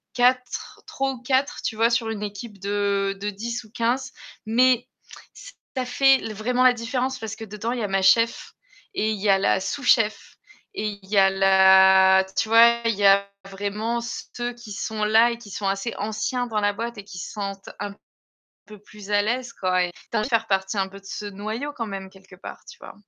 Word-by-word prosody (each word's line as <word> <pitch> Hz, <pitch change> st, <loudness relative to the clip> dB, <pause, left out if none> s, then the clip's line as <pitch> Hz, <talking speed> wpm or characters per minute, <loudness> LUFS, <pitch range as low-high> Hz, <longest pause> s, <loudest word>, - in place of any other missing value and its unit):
4 250 Hz, +1 st, 0 dB
3 270 Hz, 0 st, -2 dB
ou 255 Hz, -2 st, -9 dB
4, 265 Hz, +2 st, 0 dB
tu -, -, -2 dB
vois? 230 Hz, +2 st, +2 dB
Sur 235 Hz, -1 st, 0 dB
une 210 Hz, -2 st, -4 dB
équipe 205 Hz, 0 st, -7 dB
de 200 Hz, 0 st, -1 dB
de 205 Hz, -, -2 dB
10 235 Hz, +4 st, -5 dB
ou 215 Hz, -, -19 dB
15 245 Hz, +2 st, -1 dB, 0.4 s
mais 250 Hz, +2 st, +3 dB, 0.5 s
ç -, -, -12 dB, 0.2 s
ça 255 Hz, -, 0 dB
fait 270 Hz, +1 st, +4 dB
vraiment 245 Hz, +4 st, 0 dB
la 255 Hz, -1 st, +6 dB
différence. 250 Hz, +2 st, -3 dB
Parce 220 Hz, -1 st, -6 dB
que 225 Hz, -, -8 dB
dedans 210 Hz, +2 st, -5 dB
il 245 Hz, -, -3 dB
y -, -, -2 dB
a -, -, -1 dB
ma 195 Hz, 0 st, 0 dB
chef 230 Hz, +4 st, +2 dB, 0.4 s
et 215 Hz, +1 st, 0 dB
il 210 Hz, -, -4 dB
y 205 Hz, -, +1 dB
a 195 Hz, -, +6 dB
la 190 Hz, 0 st, +2 dB
sous-chef 225 Hz, -1 st, 0 dB, 0.4 s
et 215 Hz, -, -3 dB, 0.2 s
il 190 Hz, -, -17 dB
y 210 Hz, -, 0 dB
a 195 Hz, 0 st, +6 dB
la 190 Hz, 0 st, +6 dB
tu 210 Hz, +3 st, +1 dB
vois, 235 Hz, +1 st, +6 dB
il 230 Hz, -1 st, +1 dB
y 200 Hz, 0 st, 0 dB
a 200 Hz, 0 st, +5 dB, 0.2 s
vraiment 205 Hz, +4 st, -3 dB
ceux 240 Hz, +1 st, -5 dB
qui 235 Hz, -3 st, -12 dB
sont 215 Hz, +1 st, -4 dB
là 220 Hz, +3 st, +4 dB
et 235 Hz, -, -5 dB
qui 230 Hz, -3 st, -13 dB
sont 200 Hz, 0 st, -4 dB
assez 195 Hz, +4 st, -2 dB
anciens 220 Hz, +4 st, -2 dB
dans 215 Hz, -2 st, -1 dB
la 205 Hz, -, +2 dB
boîte 230 Hz, +2 st, -5 dB
et 205 Hz, -, -8 dB
qui 195 Hz, -2 st, -11 dB
se 180 Hz, -, -6 dB
sentent 195 Hz, -2 st, -6 dB
un 205 Hz, 0 st, -4 dB, 0.7 s
peu 210 Hz, 0 st, -12 dB
plus 210 Hz, 0 st, -13 dB
à 205 Hz, 0 st, +3 dB
l'aise 245 Hz, +2 st, -2 dB
quoi 185 Hz, -3 st, 0 dB
et 175 Hz, -, -4 dB
tu 230 Hz, -, -8 dB
as -, -, +3 dB
envie 215 Hz, -, -1 dB
de -, -, -6 dB
faire 230 Hz, -3 st, +1 dB
partie 195 Hz, 0 st, -1 dB
un 195 Hz, -, +1 dB
peu 195 Hz, +1 st, -12 dB
de -, -, -28 dB
ce 205 Hz, +1 st, -7 dB
noyau 215 Hz, +8 st, -5 dB
quand 230 Hz, -5 st, -5 dB
même, 195 Hz, -1 st, -6 dB
quelque 190 Hz, -1 st, -17 dB
part, -, -, -10 dB
tu 475 Hz, -, -15 dB
vois? -, -, -11 dB
215 Hz, 225 wpm, -23 LUFS, 195-235 Hz, 0.7 s, la